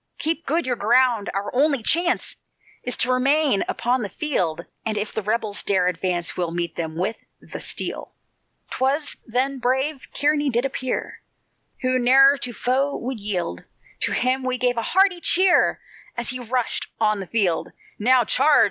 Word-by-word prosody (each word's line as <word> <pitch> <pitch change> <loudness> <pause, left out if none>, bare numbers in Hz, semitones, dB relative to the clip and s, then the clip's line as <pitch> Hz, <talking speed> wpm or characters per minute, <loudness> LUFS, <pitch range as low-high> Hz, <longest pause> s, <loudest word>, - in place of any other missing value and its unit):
Keep 330 -1 -2
good 330 +4 +1
your 250 -1 0
ground, 235 0 +2
our 200 +1 -4
only 280 -1 +2
chance 345 +7 0 0.5
Is 250 - 0
t' - - +1
remain 265 -1 +2
upon 245 +2 0
the 205 - -4
field. 175 - -2 0.2
And 220 -1 -2
if 210 +1 -3
the 220 - -2
rebels 215 0 -1
dare 185 -3 +2
advance, 175 -1 -2
We'll 175 -2 -1
meet 170 0 -3
them 160 -1 -4
with 185 +6 -2 0.2
the - - -9
steel." - - -4 0.6
'Twas 280 +3 0
then 260 +3 -1
brave 265 +3 -1
Kearny 290 0 +1
did 240 +1 0
appear, 260 -1 -3 0.6
Who 255 0 +2
ne'er 270 +3 +6
to 250 -3 -4
foe 265 +5 0
would 250 -1 -5
yield, 180 - -3 0.4
To - - -1
him 255 +1 +1
we 255 0 -1
gave 245 0 +1
a 230 - -1
hearty 375 - +3
cheer, 370 +1 +3 0.4
As 235 - -1
he 255 - -4
rushed 245 0 -2
on 215 -2 +2
the 190 - -6
field. 195 -7 0 0.3
"Now, 250 +3 +4
charge! 295 +6 +4
250 Hz, 165 wpm, -23 LUFS, 210-275 Hz, 0.6 s, ne'er